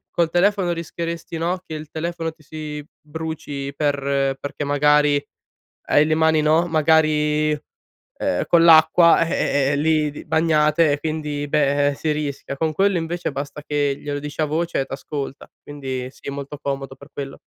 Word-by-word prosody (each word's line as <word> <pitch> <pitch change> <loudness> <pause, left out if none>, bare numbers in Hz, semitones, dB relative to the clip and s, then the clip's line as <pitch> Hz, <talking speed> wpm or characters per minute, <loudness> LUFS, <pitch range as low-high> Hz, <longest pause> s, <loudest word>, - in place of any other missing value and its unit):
col 170 -2 +1
telefono 185 +1 +2
rischieresti 170 +1 -5
no, 175 +3 -1
che 160 - -6
il 155 -1 -8
telefono 165 0 -3
ti 160 0 -23
si 150 0 -7 0.2
bruci 150 -3 -6
per 140 -2 0
perché 140 +1 -4
magari 145 0 +3 0.7
hai 145 - +5
le 155 - +2
mani 160 -1 +3
no, 160 +3 +3
magari, 155 -1 +2 0.7
ehm, - - 0
con 170 -1 +5
l'acqua, 165 +1 +6
eh 140 -4 +1
eh - - +1
lì 155 0 +2
di 145 - -10
bagnate 155 0 +3
e 145 - -2
quindi 150 -2 -3
beh, 145 -1 +2
eh, - - -2
si 155 +2 -1
rischia. 145 -2 -4
Con 160 +2 0
quello 195 +3 +2
invece 170 0 -3
basta 140 +2 -6
che 145 -2 0
glielo 145 0 -4
dici 150 +2 -5
a - - +3
voce 165 +3 -1
e 135 - 0
t'ascolta. 140 0 -6
Quindi 130 -3 -5
sì, 135 - -9
molto 140 +1 -6
comodo 135 -1 -4
per 140 +2 -15
quello. 135 -1 -6
150 Hz, 170 wpm, -21 LUFS, 145-160 Hz, 0.7 s, l'acqua